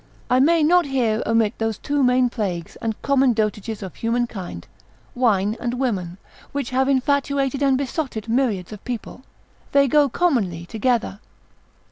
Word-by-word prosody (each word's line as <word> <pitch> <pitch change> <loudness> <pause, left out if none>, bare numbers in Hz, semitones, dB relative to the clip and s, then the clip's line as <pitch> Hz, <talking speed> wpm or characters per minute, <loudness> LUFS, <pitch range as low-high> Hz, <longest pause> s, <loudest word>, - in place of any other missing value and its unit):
I 250 - +5
may 320 +4 +4
not 345 +1 +4
here 235 -5 0
omit 225 -2 +1
those 225 -1 -1
two 290 0 -1
main 250 0 +4
plagues, 180 -8 -4
and 220 -2 -3
common 270 -2 +3
dotages 215 0 -2
of 190 - -7
human 235 +1 0
kind, 180 - -8 0.5
wine 215 -4 +1
and 245 0 -2
women, 195 -9 -2 0.4
which 280 -3 -3
have 265 +1 +1
infatuated 275 0 +1
and 270 -2 +3
besotted 265 -5 -3
myriads 225 -7 0
of 205 - -11
people; 245 0 -6 0.5
they 280 0 +5
go 290 +2 +4
commonly 225 - 0
together. 225 -1 -1
245 Hz, 150 wpm, -22 LUFS, 215-275 Hz, 0.5 s, I